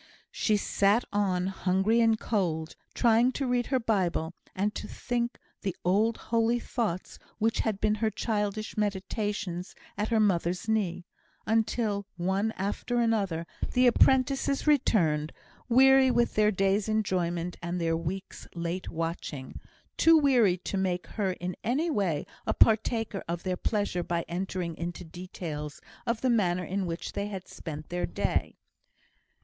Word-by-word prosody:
She 215 -2 +1
sat 205 +3 +2
on, 190 -3 +1
hungry 195 +4 +2
and 225 -1 +3
cold, 165 -9 -1 0.2
trying 235 +1 +4
to 275 - -2
read 245 -1 +1
her 265 - +2
Bible, 180 -7 0 0.2
and 205 +2 0
to - - -5
think 240 -1 -2 0.2
the 195 -4 -2
old 210 +5 +3
holy 230 +1 +1
thoughts 215 -8 -3 0.2
which 225 +1 +1
had 215 -3 0
been 210 0 +2
her 220 - +3
childish 215 -1 -2
meditations 205 -3 -2 0.2
at 210 - +1
her 225 -1 +2
mother's 185 -1 +1
knee, 200 -5 0 0.4
until 220 -2 0
one 190 +5 0
after 205 +5 -2
another 200 -8 +1 0.3
the 250 +1 +4
apprentices 265 +2 +3
returned, 165 - +2 0.4
weary 265 +2 +6
with 240 -1 +2
their 210 0 +4
day's 195 +1 +1
enjoyment, 180 -5 -1
and 175 +1 -3
their 165 -1 +1
week's 170 +4 -5
late 170 +2 -3
watching; 165 -5 -4 0.4
too 325 0 +7
weary 245 - +4
to 190 +2 -4
make 185 -2 -1
her 195 -4 -2
in 180 0 -5
any 295 +9 +1
way 185 - 0 0.2
a - - +1
partaker 225 -2 +2
of 170 +1 -3
their 185 -1 -1
pleasure 205 -2 -1
by 170 -1 -2
entering 180 -1 -3
into 175 +1 -5
details 160 -4 -6 0.3
of 230 -1 0
the 260 - +2
manner 180 -6 +2
in 190 +1 -2
which 165 0 -5
they 200 - -2
had 195 -3 -6
spent 155 -2 -8
their 175 0 -1
day. 85 - -1
200 Hz, 145 wpm, -29 LUFS, 175-225 Hz, 0.4 s, too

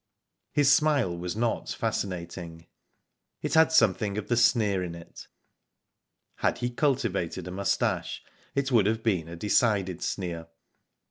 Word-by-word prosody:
His 145 -1 +4
smile 145 - +2
was 90 +1 -4
not 115 +1 -1
fascinating. 85 -3 -4 0.8
It - - -2
had 160 0 +5
something 105 - +3
of 105 - -5
the 120 - +3
sneer 110 -5 +3
in 85 -1 -5
it. 85 0 -12 1.1
Had - - 0
he 120 0 -2
cultivated 115 - -1
a - - -5
moustache, 100 +2 -1 0.3
it 140 0 0
would 110 -5 +4
have 110 +1 -1
been 95 -8 0
a 85 - -8
decided 95 -1 +1
sneer. 85 -4 -4
100 Hz, 135 wpm, -27 LUFS, 90-120 Hz, 1.1 s, had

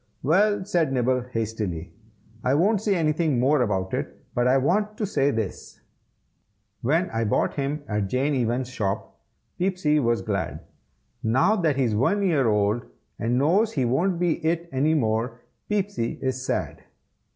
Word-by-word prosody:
"Well," 195 +7 +3
said 170 -7 +1
Nibble, 125 0 +1
hastily, 105 -7 -3 0.5
"I 130 +2 +2
won't 200 +6 +3
say 210 -2 +1
anything 155 -4 +1
more 140 +3 +3
about 95 -5 -1
it, - - -3
but 120 0 +1
I 130 +2 +4
want 205 +10 +1
to 215 - -1
say 140 -8 +1
this: 110 -7 -4 1.0
"When 165 +9 +2
I 115 0 -1
bought 105 - +1
him 145 +1 -2
at 105 -2 -1
Jane 135 +7 0
Evans's 125 0 -1
shop, 100 -5 -3 0.4
Peepsy 180 -5 +1
was 120 -3 +1
glad. 100 -6 -3 0.6
Now 130 - +3
that 165 -8 +1
he 135 - +1
is 115 -4 +1
one 200 - +2
year 155 -10 +2
old 105 +2 +1 0.3
and 120 +2 0
knows 180 - +3
that - - -13
he 130 -4 +1
won't 170 +10 +1
be 175 -1 0
it 170 +1 0
any 145 +4 +2
more, 115 -2 -1 0.3
Peepsy 200 - -1
is 130 -1 -2
sad." - - -2
135 Hz, 160 wpm, -25 LUFS, 115-170 Hz, 1.0 s, I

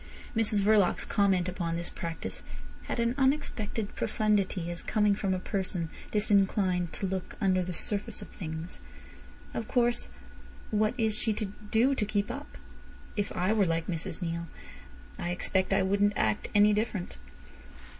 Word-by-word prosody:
Mrs 215 -2 +4
Verloc's 205 -3 +4
comment 195 -4 +2
upon 175 -2 -2
this 170 +1 -3
practice 165 -2 -4 0.4
had - - -3
an 235 +1 +2
unexpected 255 -6 0
profundity, 200 -5 0
as 170 - -5
coming 210 -1 +2
from 200 -1 -1
a 185 - +1
person 185 -4 -2 0.2
disinclined 195 -4 +2
to - - -2
look 190 -1 -3
under 190 -3 +3
the 180 0 -3
surface 200 +4 -2
of - - -9
things. 160 -1 -6 0.7
"Of 225 - -3
course, 240 -1 +2 0.6
what 215 0 +2
is 220 -2 +2
she 220 - +2
to 215 +1 -1
do 220 +6 +1
to 250 - 0
keep 205 0 0
up? 290 +1 -8 0.6
If 205 -1 -1
I 185 +4 +2
were 210 -3 +3
like 165 -1 0
Mrs 165 0 -3
Neale 170 0 -3 0.7
I 175 - -2
expect 185 +1 +1
I - - +4
wouldn't 200 +2 +3
act 110 -1 +1
any 205 +1 +6
different." 205 - -2
200 Hz, 155 wpm, -30 LUFS, 180-215 Hz, 0.7 s, any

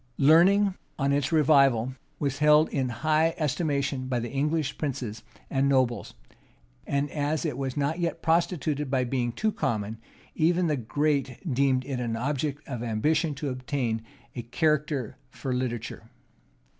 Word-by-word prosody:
Learning, 185 +7 +5 0.2
on 140 -1 +1
its 145 +1 0
revival, 140 -6 +4 0.2
was 140 -1 -2
held 150 +1 +6
in 130 -3 -1
high 155 +6 +1
estimation 140 -3 -1
by 125 -2 0
the 120 0 -5
English 150 +1 0
princes 120 -7 -3 0.3
and 135 0 +1
nobles; 130 -3 +1 0.7
and 140 +1 0
as 150 -1 -1
it - - -1
was 135 0 -4
not 145 +4 0
yet 170 -1 -1
prostituted 160 -4 +1
by 130 -1 +1
being 120 -1 -1
too 215 - 0
common, 110 - -2 0.3
even 175 +3 +2
the 155 -3 +1
great 140 +1 -1 0.2
deemed 130 -1 +2
it 135 -3 -3
an 115 -2 -2
object 145 +4 -2
of 125 -5 -5
ambition 145 +8 0
to 140 0 -3
attain 125 -3 -2 0.3
a 120 - -3
character 145 0 0
for 130 0 -4
literature. 125 -2 -4
140 Hz, 145 wpm, -27 LUFS, 125-155 Hz, 0.7 s, held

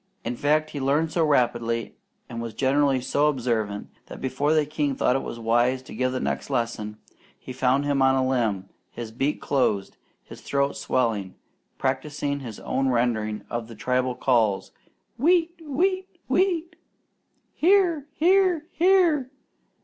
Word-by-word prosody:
In 120 +2 -2
fact, 155 +4 +1
he 145 - -5
learned 145 +4 +1
so 165 - +1
rapidly 120 -5 +1 0.3
and 115 0 -6
was 115 -1 -6
generally 135 -1 +2
so 145 +4 +1
observant, 115 -7 -1 0.2
that - - -9
before 135 +3 0
the 155 -1 +3
king 145 -2 -1
thought 125 - +2
it - - +2
wise 120 +3 0
to - - -11
give 130 0 0
the 130 - -2
next - - -3
lesson, 115 -5 -2 0.4
he 130 - -9
found 130 +2 +1
him 140 -1 +1
on 135 0 +4
a 130 -1 +1
limb, 110 -7 0 0.2
his 115 -2 -7
beak 135 +6 -1
closed, 110 -8 0 0.3
his - - -12
throat 140 0 0
swelling, 110 -7 -1 0.4
practising 140 +1 -2
his 115 -6 -8
own 135 0 0
rendering 115 -3 0
of 120 -1 -4
the 115 - -11
tribal 125 +2 0
calls, 115 -6 +1 0.5
"Wheat! 335 +3 +3
Wheat! 370 +6 0 0.2
Wheat!" 350 -3 +1 0.8
"Here! 345 -4 +3
Here! 360 -1 +3
Here!" 340 -7 +3
135 Hz, 150 wpm, -25 LUFS, 120-155 Hz, 0.8 s, on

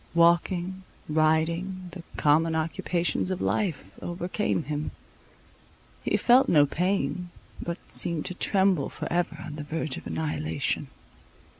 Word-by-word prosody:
Walking, 175 +2 +3 0.3
riding, 165 +4 +1
the 180 - -8 0.2
common 160 +2 +3
occupations 170 +3 0
of 185 -1 -1
life, 175 -10 0 0.2
overcame 175 +1 -1
him: 150 0 -3 1.1
he - - +2
felt 250 +2 +5
no 145 -3 +6
pain, 175 +1 0 0.3
but 170 +1 -6
seemed 170 -3 -1
to 185 - -3
tremble 190 -4 +2
for - - -5
ever 175 -2 0
on 150 - -7
the 150 - -4
verge 155 -2 -2
of - - -8
annihilation. 115 - -1
170 Hz, 125 wpm, -27 LUFS, 155-180 Hz, 1.1 s, no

